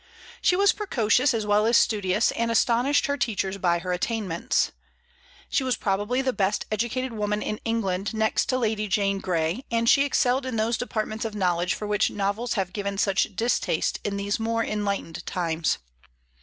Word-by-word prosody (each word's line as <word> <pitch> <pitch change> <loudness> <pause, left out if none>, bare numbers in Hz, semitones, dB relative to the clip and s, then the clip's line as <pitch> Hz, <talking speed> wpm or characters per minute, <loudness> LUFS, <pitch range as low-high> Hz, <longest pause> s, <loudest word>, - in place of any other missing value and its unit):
She 360 - +3
was 400 +2 +4
precocious 255 - +2
as 225 -3 -1
well 210 +1 +3
as 235 - +5
studious, 205 0 +2
and 230 0 -1
astonished 240 +5 +2
her 285 0 -1
teachers 200 -5 -1
by 175 -2 +2
her 180 +1 -3
attainments. 185 -2 -1 0.8
She 275 - 0
was 255 -1 +1
probably 210 +6 0
the 260 -1 0
best 200 -1 0
educated 240 +3 -1
woman 210 -1 -1
in 215 - -3
England 200 -4 -1
next 220 0 +1
to 255 - +1
Lady 215 -3 -1
Jane 200 -1 +1
Grey, 175 +5 -1
and 230 0 0
she 275 - +6
excelled 260 -1 +1
in 255 - -3
those 225 +2 +1
departments 220 -2 -3
of 220 -2 -4
knowledge 180 -3 +1
for 210 - -5
which 210 -1 +1
novels 205 +4 -2
have 190 -3 -2
given 200 -1 -3
such 195 0 +1
distaste 235 +5 0
in 200 -1 -2
these 200 +1 -1
more 230 0 0
enlightened 200 -5 -3
times. 165 -3 0
215 Hz, 175 wpm, -25 LUFS, 195-235 Hz, 0.8 s, she